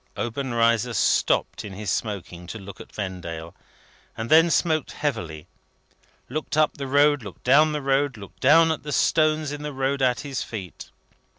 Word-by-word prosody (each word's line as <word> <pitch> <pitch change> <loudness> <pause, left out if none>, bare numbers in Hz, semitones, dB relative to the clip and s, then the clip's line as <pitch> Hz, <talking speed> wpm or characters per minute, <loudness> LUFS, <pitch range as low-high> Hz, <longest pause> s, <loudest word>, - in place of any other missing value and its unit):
Obenreizer 120 -1 0
stopped - - +1
in 100 - -8
his 100 0 -4
smoking 90 -5 -4
to 115 - -6
look 100 -1 -10
at - - -13
Vendale, 85 -5 -6 0.6
and 115 +1 -5
then 165 +2 +7
smoked 160 -2 +1
heavily, 90 - -3 0.8
looked 150 +3 -4
up 155 -1 +2
the 140 -1 -4
road, 145 +1 +4
looked 100 -4 -11
down 150 +5 +5
the 150 -2 -3
road, 135 -1 +1
looked 100 -3 -12
down 160 +4 +5
at 160 - -3
the 150 - -6
stones 155 0 +2
in 145 0 -6
the 150 0 -4
road 135 +1 -1
at 125 -2 +2
his 140 -3 -4
feet. 95 -7 -7
130 Hz, 170 wpm, -24 LUFS, 105-150 Hz, 0.8 s, then